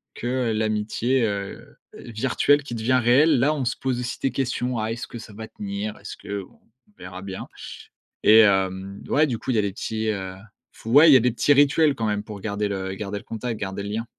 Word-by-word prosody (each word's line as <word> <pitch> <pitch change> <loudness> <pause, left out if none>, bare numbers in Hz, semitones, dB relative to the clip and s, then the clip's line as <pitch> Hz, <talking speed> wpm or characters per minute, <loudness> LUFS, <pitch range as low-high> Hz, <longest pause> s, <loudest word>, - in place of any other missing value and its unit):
que 125 -1 -1
l'amitié, 110 +4 0
heu, 100 -2 -5 0.2
virtuelle 135 +5 +1
qui 130 -4 -6
devient 125 +3 +2
réelle. 130 +5 +4
Là, 140 +5 +3
on 135 -4 -2
se 120 - -1
pose 130 -1 -2
aussi 125 +1 -4
des 135 - 0
questions: 125 -1 -2
«Ah, 110 +1 -2
est-ce 115 +1 -5
que - - -9
ça 110 -2 -11
va 110 +1 -8
tenir? 205 - -5
Est-ce - - -9
que, 100 0 -5
bon, - - -20 0.3
on - - -28
verra 90 0 -9
bien» 95 -1 -7 0.8
et 110 +1 +8
hem, 95 -1 +1
ouais, 150 +2 +4
du 120 -6 -3
coup, - - -8
il - - 0
y - - +2
a - - +4
les 100 - -1
petits, 110 +2 -3
heu, 95 -3 -4 0.4
f - - -19
ouais, 145 +8 +7
il - - +8
y - - +9
a - - +4
des 125 +1 +2
petits 135 +5 +3
rituels 145 +1 +4
quand 115 - -3
même 105 -1 0
pour 105 -1 -9
garder 105 0 -2
le 95 -1 -4
garder 100 +1 -5
le - - -9
contact, 115 0 -5
garder 95 0 -4
le 100 - -5
lien. 110 +2 -3
115 Hz, 235 wpm, -24 LUFS, 100-130 Hz, 0.8 s, y